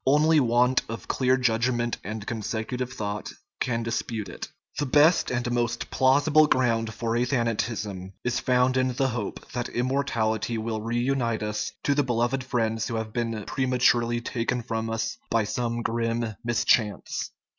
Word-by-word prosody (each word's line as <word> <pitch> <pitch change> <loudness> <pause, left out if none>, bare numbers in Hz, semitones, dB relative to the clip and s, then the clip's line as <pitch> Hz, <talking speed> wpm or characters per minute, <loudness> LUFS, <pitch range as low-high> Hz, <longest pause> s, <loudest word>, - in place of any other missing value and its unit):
Only 155 +3 +5
want 125 0 +3
of 115 - -6
clear 130 0 +2
judg 120 -1 +2
ment 120 -1 -1
and 105 +1 -5
consecutive 115 +3 -3
thought 105 -3 -4 0.3
can 115 -2 -1
dispute 110 -3 -3
it. - - -7 0.3
The 145 - 0
best 150 +6 +5
and 120 -1 -1
most 120 -1 -1
plausible 145 +4 +4
ground 115 -5 +1
for 115 +1 -2
athanatism 115 -6 -1 0.2
is 120 0 0
found 125 0 +2
in 130 0 +1
the 135 +1 +1
hope 115 -4 -5
that 120 0 -3
immortality 120 -3 0
will 110 0 -3
reunite 120 0 0
us 105 0 -2
to 145 - +2
the 145 - +3
beloved 120 0 0
friends 115 -3 -1
who 115 - -3
have 110 -1 -4
been 115 -3 -2
prematurely 125 -2 +2
taken 120 +1 -2
from 115 -1 -3
us 115 0 -2
by 115 -1 +2
some 120 +1 -2
grim 115 0 -1
mischance. 115 -2 +1
120 Hz, 155 wpm, -26 LUFS, 115-125 Hz, 0.3 s, Only